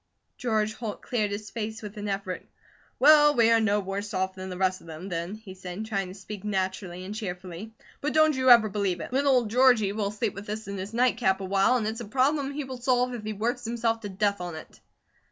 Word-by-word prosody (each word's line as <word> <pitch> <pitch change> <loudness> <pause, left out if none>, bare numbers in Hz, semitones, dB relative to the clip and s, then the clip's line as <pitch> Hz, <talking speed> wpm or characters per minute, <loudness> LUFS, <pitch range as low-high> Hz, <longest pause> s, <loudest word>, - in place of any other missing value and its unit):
George 215 -3 0
Holt 220 -3 -6
cleared 215 -4 0
his 205 +1 -5
face 220 -1 -5
with 210 +1 -7
an 210 0 -5
effort. 195 -2 -3 0.5
"Well, 295 +1 +7
we 230 -2 +5
are 230 - +5
no 210 -1 +2
worse 200 +1 -4
off 190 0 0
than 185 0 -7
the 180 - -6
rest 185 0 +1
of - - -16
them, 165 +4 -8
then," 170 +3 -3
he 215 -3 -11
said, 185 +3 -6
trying 195 -4 -2
to 185 - -9
speak 200 +1 -8
naturally 190 -2 -3
and 200 - -5
cheerfully. 190 0 -6 0.3
"But 295 - -1
don't 310 -1 +5
you 260 0 +2
ever 235 -3 +8
believe 195 -3 -1
it! 235 - -7
Little 275 +1 +3
old 235 -4 +1
Georgie 245 -5 +5
will 205 -1 -1
sleep 210 +1 -2
with 195 +2 -9
this 215 +1 -5
in 200 - -4
his 190 +3 -5
night 245 -1 +3
cap 190 -5 +2
awhile, 195 +6 +2
and 225 - -2
it's 220 +2 -3
a - - -5
problem 270 +5 +1
he 285 +1 -4
will 260 -2 -8
solve 250 0 +2
if 235 -3 -6
he 215 0 -3
works 240 +4 -2
himself 230 0 0
to 205 -2 -6
death 200 0 0
on 175 -2 -5
it." 155 - -11
210 Hz, 240 wpm, -27 LUFS, 190-240 Hz, 0.5 s, ever